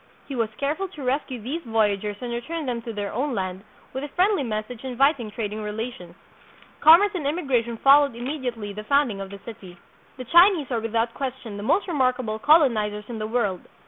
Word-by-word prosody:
He 280 - -6
was 230 -4 0
careful 305 +8 -1
to 305 -7 -10
rescue 260 -1 -2
these 270 +10 -4
voyagers 210 -4 0
and 245 -1 -4
return 315 +7 -4
them 240 -2 -2
to 230 - -6
their 205 -2 -4
own 260 +2 -1
land, 185 -1 -4 0.3
with 265 +2 -4
a - - -3
friendly 370 +5 +2
message 220 0 -4
inviting 265 -2 +1
trading 210 0 -4
rela 220 +3 -4
tions. 175 -1 -13 0.6
Commerce 340 +7 +7
and 320 -7 -2
immigration 255 -7 -1
followed 280 0 +5
immediately 240 -5 -4
the 210 +1 -7
founding 280 -8 +1
of 195 - -6
the 200 - -9
city. 195 -6 -10 0.4
The 255 - -7
Chinese 345 - +5
are 235 - +1
without 225 +1 -1
question 255 -5 -5
the 205 - -6
most 365 - +1
remarkable 255 -8 0
colonizers 215 -8 +3
in 230 -2 -5
the 215 - -3
world. 210 -6 -1
240 Hz, 190 wpm, -24 LUFS, 215-280 Hz, 0.6 s, Commerce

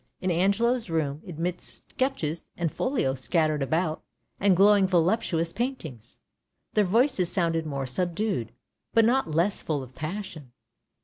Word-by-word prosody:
In 185 -1 -1
Angelo's 220 +6 +2
room 155 -3 -1
amidst 175 +1 -5
sketches 175 - -2
and 170 -3 -1
folios 135 - -1
scattered 155 +1 +1
about, 160 +3 0 0.4
and 195 -2 +4
glowing 200 0 +6
voluptuous 170 -2 +1
paintings, 195 - -5 0.6
their 210 - +3
voices 215 -2 +2
sounded 165 -3 0
more 140 -2 -3
subdued, 175 - -1 0.4
but 225 -1 +6
not 250 -4 +2
less 170 +6 +1
full 145 -4 -2
of 130 0 -12
passion. 155 -5 -6
170 Hz, 130 wpm, -27 LUFS, 155-205 Hz, 0.6 s, glowing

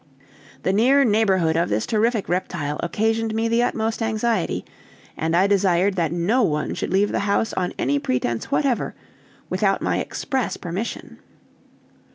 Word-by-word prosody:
The 190 - +1
near 260 +7 +4
neighborhood 195 -8 +2
of 170 +1 +1
this 105 +1 0
terrific 220 -1 +1
reptile 170 -5 -2
occasioned 220 +4 0
me 225 +1 +1
the 230 +1 +2
utmost 225 -1 -1
anxiety; 225 -3 -1 0.5
and 160 +1 -1
I 185 +3 +4
desired 195 -1 +2
that 170 -4 0
no 175 +9 +1
one 150 -8 0
should - - -4
leave 200 +2 +2
the - - 0
house 200 +2 0
on 180 -1 -1
any 140 +2 +1
pretense 125 -3 -2
whatever, 275 -3 0 0.5
without - - +1
my - - 0
express 265 -4 -2
permission. 185 +6 -5
200 Hz, 150 wpm, -22 LUFS, 170-225 Hz, 0.5 s, near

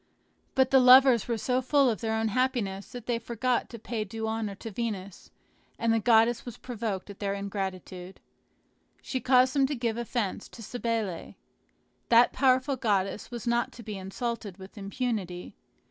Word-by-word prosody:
But 265 -1 +3
the 265 - +7
lovers 255 -2 +7
were 235 -2 -1
so 250 +3 0
full 275 +1 +3
of 225 -3 -1
their 220 -1 -1
own 220 0 0
happiness 220 -5 -1
that 245 -2 -8
they 240 -1 -1
forgot 240 +2 -1
to 230 - -8
pay 225 0 -4
due 220 +2 -5
honor 220 -2 -3
to 225 +3 -8
Venus; 200 -4 -5 0.5
and 230 -1 +1
the 225 - +2
goddess 225 +1 +4
was 240 -3 -8
provoked 215 -5 -4
at 200 - -13
their 200 -1 -1
ingratitude. 190 -2 -5 0.8
She 260 - -3
caused 255 0 +4
them 275 -2 +3
to 290 - -2
give 235 -2 -2
offence 235 -4 -3
to 230 - -11
Cybele. 225 -5 -3 0.7
That 235 +1 +6
powerful 260 0 +2
goddess 205 -4 -1
was 240 -1 -7
not 235 0 +1
to 235 - -11
be 215 -1 -6
insulted 200 +1 -5
with 190 0 -12
impunity. 200 -4 -4
230 Hz, 170 wpm, -28 LUFS, 200-245 Hz, 0.8 s, the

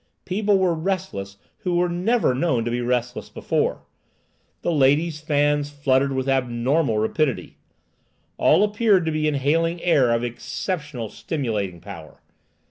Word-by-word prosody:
People 200 +1 +1
were 185 -2 +2
restless 160 - -3 0.2
who 180 -2 -1
were 175 +1 +2
never 180 - +1
known 125 -4 0
to 120 - -1
be 120 +1 -1
restless 125 0 -2
before. - - -1 0.8
The - - +1
ladies' 150 +2 +2
fans 145 -1 +1
fluttered 140 -1 +1
with 130 0 -2
abnormal 130 0 +1
rapidity. 130 +5 -1 0.8
All 200 - +5
appeared 210 -3 +3
to 160 - 0
be 155 0 0
inhaling 160 +4 +1
air 140 -8 +4
of 115 0 +1
exceptional 130 - -4
stimulating 105 - -3
power. 85 -7 -11
145 Hz, 130 wpm, -23 LUFS, 120-170 Hz, 0.8 s, All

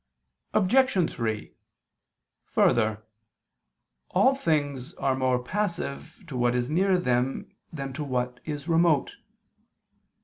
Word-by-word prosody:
Obj. 215 -3 +3
3: 110 -3 -3 0.9
Further, 110 -2 +2 1.1
all 265 - +4
things 145 - -1
are 135 -1 0
more 130 -1 +1
passive 170 - -3
to 150 -6 -8
what 120 0 +2
is 125 +2 -1
near 185 +3 +3
them 125 -5 -1 0.2
than 135 -4 -5
to 150 +3 -4
what 125 -2 -2
is 150 -1 -5
remote. 165 -4 +2
140 Hz, 105 wpm, -27 LUFS, 125-170 Hz, 1.1 s, all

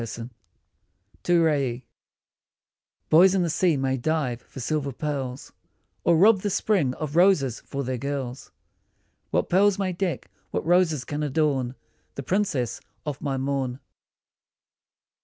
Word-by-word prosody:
88 115 +1 -6 0.9
TO 175 -1 +3
RAIE 135 -6 0 1.3
BOYS 180 +4 +7
in 185 - +2
the 170 - 0
sea 170 -2 +2
may 135 0 0
dive 130 -3 -1
for - - -12
silver 140 +2 -1
pearls, 135 -2 -4 0.5
Or 170 -1 +4
rob 205 +4 +6
the 205 - -1
spring 180 -10 +1
of 155 -1 -5
roses 165 - +3
for 140 0 -5
their 130 -1 -3
girls; 135 -2 -4 0.8
What - - 0
pearls 195 +2 +3
may 190 -2 -1
deck, 175 -1 -3 0.2
what - - -3
roses 165 -6 +2
can 145 +2 -4
adorn 140 -4 0 0.4
The 140 - -5
princess 145 - -1 0.2
of 145 -2 -4
my 135 -2 -2
morn 135 -1 -2
145 Hz, 135 wpm, -25 LUFS, 130-175 Hz, 1.3 s, BOYS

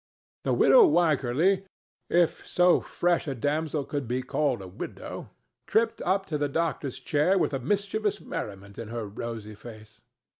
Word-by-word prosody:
The - - +2
widow 475 -6 +7
Wycherly—if 175 - +1
so 180 0 +4
fresh 175 -1 0
a 135 - -2
damsel 150 +3 -1
could 145 -4 -4
be 125 +2 -1
called 135 -1 0
a - - -8
widow—tripped 220 - -4
up 190 +2 +1
to 155 -5 -3
the 145 -1 0
doctor's 150 -3 -2
chair 155 +6 +2
with 170 - +1
a 135 - -1
mischievous 205 - -1
merriment 100 -1 -7
in 115 - -6
her 115 0 -4
rosy 110 +1 -6
face. 110 0 -13
150 Hz, 145 wpm, -27 LUFS, 120-180 Hz, -, widow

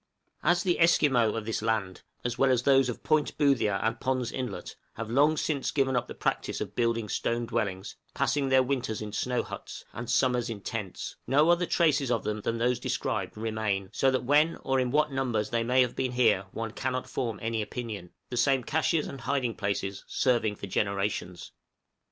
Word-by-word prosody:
} - - -41
As 175 0 +1
the 180 -2 +1
Esquimaux 135 -9 +4
of 110 -2 -3
this 115 -1 -2
land, 105 -5 -1 0.2
as 120 -1 -2
well 135 +2 +3
as 125 -2 +2
those 135 -2 +4
of 120 - -6
Boothia 140 -9 +2
and 115 0 0
Pond's 130 -2 -1
Inlet, 125 -6 -5 0.2
have 115 0 -5
long 145 +5 +4
since 145 -3 -1
given 135 -2 +1
up 125 - 0
the - - -8
practice - - -1
of 105 -1 -5
building 115 -2 0
stone 115 +3 -1
dwellings 105 -5 -3 0.2
passing 140 -1 +1
their 130 0 +5
winters 125 -4 -2
in 105 -1 -7
snow 125 +2 0
huts, - - -8
and 120 0 -6
summers 125 -2 +2
in 110 -3 -5
tents 105 -3 -5
no 150 +5 +5
other 175 0 +2
traces 145 -6 +2
of 115 -2 +1
them 105 0 -2
than 115 +3 -1
those 120 +1 +1
described 125 - -2
remain; 110 -3 -2
so 135 - +3
that 130 -1 0
when 150 +5 +3
or 135 0 +1
in 125 -1 +1
what 150 +3 +2
numbers 120 -6 -1
they 115 -1 +1
may 125 +2 +3
have 125 -2 +1
been 130 -1 -1
here 110 -6 +3
one 115 -1 -4
cannot 130 +2 -3
form 115 -5 -3
any 115 0 -1
opinion, 105 -5 -5 0.2
the 125 - -3
same 130 +2 +3
câches 155 +2 +1
and 135 - -8
hiding 130 -4 0
places 100 -1 -3
serving 120 -5 +1
for 100 - -7
generations. 100 -2 -2
120 Hz, 195 wpm, -28 LUFS, 110-135 Hz, 0.2 s, their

